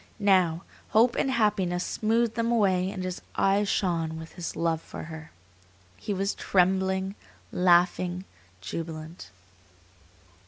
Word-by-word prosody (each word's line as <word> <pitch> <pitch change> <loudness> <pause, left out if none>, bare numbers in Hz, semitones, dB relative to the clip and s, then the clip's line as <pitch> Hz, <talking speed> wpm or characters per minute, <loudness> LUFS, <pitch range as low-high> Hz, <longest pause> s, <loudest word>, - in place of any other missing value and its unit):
Now, 185 -5 +3 0.3
hope 235 +3 +4
and - - +1
happiness 200 -7 +1
smoothed 225 +1 +1
them 230 0 0
away 190 -5 +2
and 190 -2 -5
his 185 -1 -4
eyes 200 +1 +2
shone 165 -4 0
with 160 0 -9
his 175 -2 -5
love 165 -1 0
for - - -8
her. 160 -1 -9 0.7
He 95 - -6
was 195 +1 0
trembling, 190 +1 +1 0.4
laughing, 180 0 +2 0.4
jubilant. 160 - -6
185 Hz, 120 wpm, -27 LUFS, 170-200 Hz, 0.7 s, hope